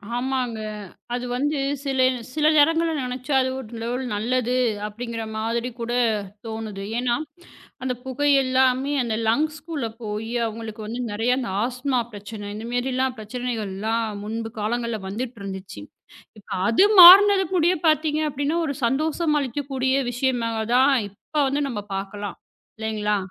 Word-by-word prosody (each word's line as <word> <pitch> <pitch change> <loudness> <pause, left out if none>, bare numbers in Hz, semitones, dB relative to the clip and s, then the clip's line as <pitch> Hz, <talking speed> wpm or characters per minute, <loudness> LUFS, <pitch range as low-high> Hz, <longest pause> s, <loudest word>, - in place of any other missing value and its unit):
ஆமாங்க. 250 -3 -1 0.6
அது 245 0 -2
வந்து 290 +3 0 0.3
சில 270 -1 -1 0.4
சில 305 -1 +2
நேரங்கள்ல 325 +2 +4
நினைச்சா 255 +3 -3
அது 260 - 0
ஒரு 230 - -10
லெவல் 245 +3 -2
நல்லது 245 +3 0 0.3
அப்பிடிங்கிற 230 +2 -5
மாதிரி 230 +2 -1
கூடத் 230 -4 0 0.2
தோணுது. 220 -3 -5 0.2
ஏன்னா, 245 -1 +1 0.7
அந்தப் 250 -1 -3
புகை 290 +3 0 0.2
எல்லாமே 260 +1 +2
அந்த 230 -2 -2
லங்ஸ்க்குள்ள 305 +1 -1 0.2
போய் 215 +2 -4
அவுங்களுக்கு 220 0 -6
வந்து 235 +3 -4
நிறைய 225 +4 +1
அந்த 255 - -3 0.2
ஆஸ்துமா 250 +1 -1
பிரச்சனை 205 0 -8
இந்தமாரிலாம் 250 +3 -1
பிரச்சனைகள் 225 -2 -4
எல்லாம் 225 +3 -1 0.2
முன்பு 225 +1 -4
காலங்கள்ல 235 +1 -2
வந்துட்டு 230 +2 -5
இருந்துச்சு. 190 0 -7 0.6
இப்ப 205 - -18 0.2
அது 230 - +5 0.2
மாறினது 385 +2 +10
கூடயே 350 +1 +3
பார்த்தீங்க 310 0 +2
அப்பிடின்னா 285 +3 -1
ஒரு 280 - -2
சந்தோஷம் 305 +4 +1
அளிக்கும் 280 +2 -4
கூடிய 265 +1 +1
விஷயம் 250 0 0
தான் 225 -1 -2
அதான் 255 +5 +4 0.2
இப்ப 205 +9 -13
வந்து 285 +2 0
நம்ம 210 -5 -4
பார்க்கலாம். 200 0 -5 0.4
இல்லேங்களா! 215 -1 -1
245 Hz, 135 wpm, -23 LUFS, 220-270 Hz, 0.7 s, மாறினது